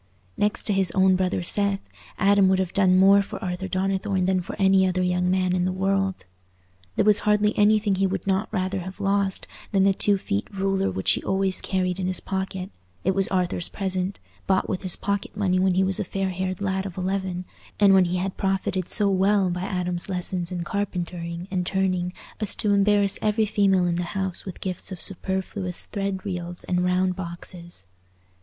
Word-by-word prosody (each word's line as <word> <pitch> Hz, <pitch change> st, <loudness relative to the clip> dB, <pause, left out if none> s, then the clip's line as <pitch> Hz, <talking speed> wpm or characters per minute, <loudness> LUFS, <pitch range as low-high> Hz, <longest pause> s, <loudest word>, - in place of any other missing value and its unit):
Next 205 Hz, 0 st, 0 dB
to 210 Hz, -, +1 dB
his 195 Hz, -2 st, +2 dB
own 190 Hz, -1 st, +4 dB
brother 185 Hz, -1 st, 0 dB
Seth, 200 Hz, +2 st, +1 dB, 0.3 s
Adam 200 Hz, -1 st, +4 dB
would 190 Hz, -, +3 dB
have 185 Hz, -2 st, -2 dB
done 185 Hz, -2 st, +4 dB
more 195 Hz, +1 st, +6 dB
for 200 Hz, -, -6 dB
Arthur 180 Hz, +1 st, -3 dB
Donnithorne 190 Hz, 0 st, 0 dB
than 185 Hz, 0 st, +1 dB
for 175 Hz, -, -7 dB
any 190 Hz, -1 st, +4 dB
other 185 Hz, 0 st, 0 dB
young 180 Hz, 0 st, +1 dB
man 185 Hz, -1 st, +1 dB
in 180 Hz, -1 st, +1 dB
the 185 Hz, -, 0 dB
world. 195 Hz, 0 st, -1 dB, 0.7 s
There -, -, +2 dB
was 210 Hz, -1 st, +4 dB
hardly 210 Hz, 0 st, +2 dB
anything 210 Hz, 0 st, +3 dB
he 190 Hz, +1 st, +1 dB
would 190 Hz, -1 st, -3 dB
not 195 Hz, +2 st, 0 dB
rather 190 Hz, -2 st, -1 dB
have 185 Hz, +2 st, -8 dB
lost 200 Hz, -1 st, 0 dB, 0.3 s
than 195 Hz, -2 st, +3 dB
the 195 Hz, 0 st, +4 dB
two 200 Hz, +1 st, +2 dB
feet 100 Hz, -, -3 dB
ruler 195 Hz, 0 st, 0 dB
which 95 Hz, -, 0 dB
he -, -, 0 dB
always 190 Hz, -1 st, 0 dB
carried 185 Hz, -1 st, -1 dB
in 185 Hz, -, -1 dB
his 185 Hz, -, +1 dB
pocket; 190 Hz, 0 st, -4 dB, 0.3 s
it 190 Hz, -, +2 dB
was 195 Hz, 0 st, +2 dB
Arthur's 180 Hz, -2 st, 0 dB
present, 190 Hz, -1 st, -2 dB, 0.3 s
bought 190 Hz, 0 st, +2 dB
with 185 Hz, -, -3 dB
his 185 Hz, -3 st, +4 dB
pocket 200 Hz, 0 st, -3 dB
money 185 Hz, -3 st, +1 dB
when 185 Hz, -1 st, +2 dB
he 190 Hz, -, +3 dB
was 190 Hz, 0 st, 0 dB
a -, -, 0 dB
fair 195 Hz, +1 st, -2 dB
haired 185 Hz, +1 st, -3 dB
lad 190 Hz, 0 st, -1 dB
of 185 Hz, -, -10 dB
eleven, 185 Hz, -1 st, -2 dB, 0.3 s
and 200 Hz, -2 st, +6 dB
when 190 Hz, -1 st, +6 dB
he 175 Hz, +1 st, -1 dB
had 185 Hz, +1 st, -3 dB
profited 190 Hz, -2 st, -1 dB
so 205 Hz, -, +4 dB
well 195 Hz, 0 st, +2 dB
by 180 Hz, +1 st, -3 dB
Adam's 180 Hz, -1 st, -2 dB
lessons 180 Hz, -1 st, -2 dB
in 175 Hz, -1 st, -3 dB
carpentering 175 Hz, -2 st, -4 dB
and 185 Hz, -2 st, 0 dB
turning 185 Hz, -1 st, 0 dB, 0.3 s
as 215 Hz, -3 st, +4 dB
to 205 Hz, -1 st, +1 dB
embarrass 200 Hz, 0 st, +3 dB
every 215 Hz, +1 st, +2 dB
female 195 Hz, -3 st, +2 dB
in 175 Hz, -, +1 dB
the -, -, 0 dB, 0.2 s
house 190 Hz, -2 st, -2 dB
with 190 Hz, -, -8 dB
gifts 185 Hz, 0 st, -4 dB
of 185 Hz, -, -6 dB
superfluous 190 Hz, -1 st, -1 dB
thread 195 Hz, -1 st, -4 dB
reels 175 Hz, -2 st, -5 dB
and 180 Hz, 0 st, 0 dB
round 180 Hz, 0 st, +1 dB
boxes. 170 Hz, -, -8 dB
190 Hz, 200 wpm, -24 LUFS, 180-195 Hz, 0.7 s, more